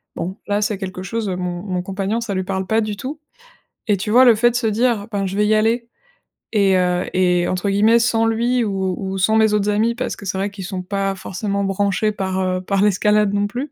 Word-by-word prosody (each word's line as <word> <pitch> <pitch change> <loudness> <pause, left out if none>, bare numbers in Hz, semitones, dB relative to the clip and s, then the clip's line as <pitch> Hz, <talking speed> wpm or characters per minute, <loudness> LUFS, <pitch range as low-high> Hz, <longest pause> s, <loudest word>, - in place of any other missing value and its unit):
Bon. 185 +3 -4
Là, 205 0 0
c'est 210 -2 -2
quelque 185 -1 -6
chose, 220 +1 -3
heu, 185 - -2
mon 180 -1 -4
mon 185 -3 -3
compagnon, 195 +3 -2
ça 230 -4 -4
lui 190 0 -1
parle 190 0 -3
pas 220 +3 +1
du 210 -1 -3
tout. 280 +8 -6 0.7
Et 205 - +3
tu 210 +2 -4
vois, 255 +3 +7
le 235 -2 +7
fait 240 +3 +3
de 240 - -9
se 240 -2 +1
dire: 220 -1 +1
«Ben 200 -1 -1
je 195 +2 -4
vais 210 - +2
y 215 - +3
aller» 230 +2 +1 0.6
et 200 -3 +3
heu 180 0 +1
et 180 -1 +2
entre 185 +2 -1
guillemets: 215 +4 +4
«sans 225 -1 +2
lui 235 +2 +1
ou 190 -3 -1
ou 195 -1 -4
sans 220 +4 +2
mes 220 -1 +4
autres 210 0 +1
amis» 220 +3 +2
parce 250 +1 -3
que 205 - -11
c'est 190 0 -2
vrai 200 +2 -1
qu'ils 195 -2 -8
sont 185 -1 -4
pas 195 +1 -2
forcément 195 +2 -3
branchés 200 +2 0
par 190 -2 -3
heu, 185 0 -1
par 195 +1 0
l'escalade 210 0 +3
non 205 0 +1
plus. 250 +8 -5
205 Hz, 245 wpm, -20 LUFS, 190-220 Hz, 0.7 s, vois